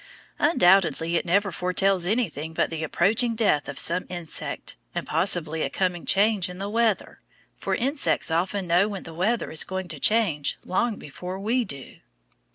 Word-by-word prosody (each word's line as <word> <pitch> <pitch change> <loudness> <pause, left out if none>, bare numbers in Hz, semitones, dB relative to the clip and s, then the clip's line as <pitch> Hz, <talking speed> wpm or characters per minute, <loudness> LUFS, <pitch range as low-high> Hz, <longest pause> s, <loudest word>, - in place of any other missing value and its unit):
Undoubtedly 175 - +3
it 170 - 0
never 200 +3 +2
foretells 180 +1 +1
anything 160 - -2
but - - 0
the 160 -1 -4
approaching 215 +9 +2
death 200 -10 +1
of - - -6
some 175 +2 +1
insect 175 -3 -4 0.2
and - - -2
possibly 165 -5 -1
a 140 - 0
coming 180 +2 -2
change 205 -2 +3
in 180 - -8
the 200 +2 -4
weather, 225 -2 0 0.4
for - - -2
insects 275 - +1
often 185 +4 0
know 175 +4 +3
when 200 -3 -6
the 165 - -10
weather 210 +8 -1
is 160 - +1
going 190 -1 -5
to 160 -4 -5
change 195 -10 +2
long 220 +4 0
before 180 +5 -7
we 235 +5 +1
do. 140 - -6
185 Hz, 165 wpm, -25 LUFS, 165-210 Hz, 0.4 s, Undoubtedly